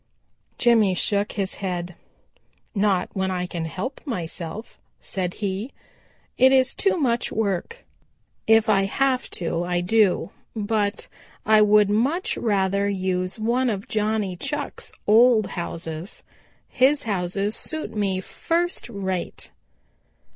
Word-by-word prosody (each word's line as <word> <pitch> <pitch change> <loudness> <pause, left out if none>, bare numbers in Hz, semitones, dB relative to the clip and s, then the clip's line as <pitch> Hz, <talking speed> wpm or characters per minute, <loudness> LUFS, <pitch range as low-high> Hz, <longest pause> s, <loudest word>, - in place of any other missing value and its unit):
Jimmy 225 -6 +4
shook 200 +3 0
his 195 -2 -2
head. 180 -2 -3 0.8
"Not 195 -4 +1
when 190 -1 -1
I 180 -1 -1
can 170 -2 -4
help 190 - -5
myself," 180 - -6 0.2
said 185 -2 -4
he, 205 +4 -3 0.7
"It 260 +1 +7
is 260 -1 +4
too 390 -2 +1
much 245 -7 0
work. 220 - -2 0.6
If 225 0 +5
I 195 -2 +3
have 260 +5 0
to 170 -1 -2
I 175 0 0
do, 190 -1 +2 0.2
but 210 -1 -1 0.4
I 215 0 +6
would 210 -1 +5
much 270 - +1
rather 200 -2 +1
use 185 -1 -1
one 240 +3 +1
of 200 -2 -3
Johnny 210 -3 0
Chuck's 295 - -4
old 225 0 +6
houses. 165 0 -6 0.4
His 280 +3 +3
houses 200 0 -1
suit 315 -1 -5
me 195 -3 0
first 340 - -1
rate." 190 -5 -4
205 Hz, 120 wpm, -24 LUFS, 185-230 Hz, 0.8 s, It